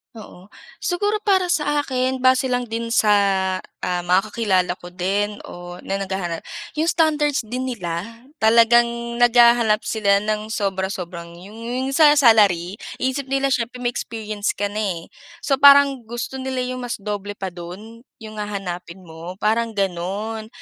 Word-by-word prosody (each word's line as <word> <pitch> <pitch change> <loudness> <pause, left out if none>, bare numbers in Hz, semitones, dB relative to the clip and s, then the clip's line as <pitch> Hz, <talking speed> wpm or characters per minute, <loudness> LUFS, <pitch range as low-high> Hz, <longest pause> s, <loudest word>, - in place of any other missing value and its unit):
Oo. 200 -3 -12 0.3
Siguro 410 +4 0
para 375 -3 +3
sa 295 -2 +1
akin, 260 -1 -1
base 260 0 +4
lang 245 0 0
din 230 0 -3
sa, 220 -2 +3 0.7
ah, 180 -1 0
mga 180 +2 +3
kakakilala 190 -6 +1
ko 175 - -10
din 200 +3 -1
o 175 0 -9
na 195 0 -2
naghahanap, 190 -4 -3 0.4
'yong 320 - +1
standards 300 -5 +2
din 250 +4 -4
nila, 220 +1 -5 0.2
talagang 230 +2 +5 0.3
naghahanap 235 -2 +5
sila 200 -2 +1
ng 215 0 -2
sobra-sobrang 190 -5 -4
'yong 200 +6 -12
'yong 260 +2 -2
sa 295 +1 +6
salary. 205 - +4 0.2
Iniisip 260 +1 -2
nila 275 0 0
siyempre 240 -1 -1
may 240 - +1
experience 215 -3 -4
ka 205 0 -2
na 210 - -3
eh. 180 -6 -3 0.3
So 275 -2 +1
parang 280 -4 +6
gusto 240 +3 -5
nila 260 -1 -2
'yong 255 0 -4
mas 245 -1 -4
doble 205 0 -5
pa 190 -2 -5
do'n, 185 +7 -10 0.2
'yong 215 0 -8
hahanapin 190 -3 -6
mo, 170 +2 -9
parang 220 +2 0
gano'n. 200 +4 -3
220 Hz, 150 wpm, -21 LUFS, 190-255 Hz, 0.7 s, sa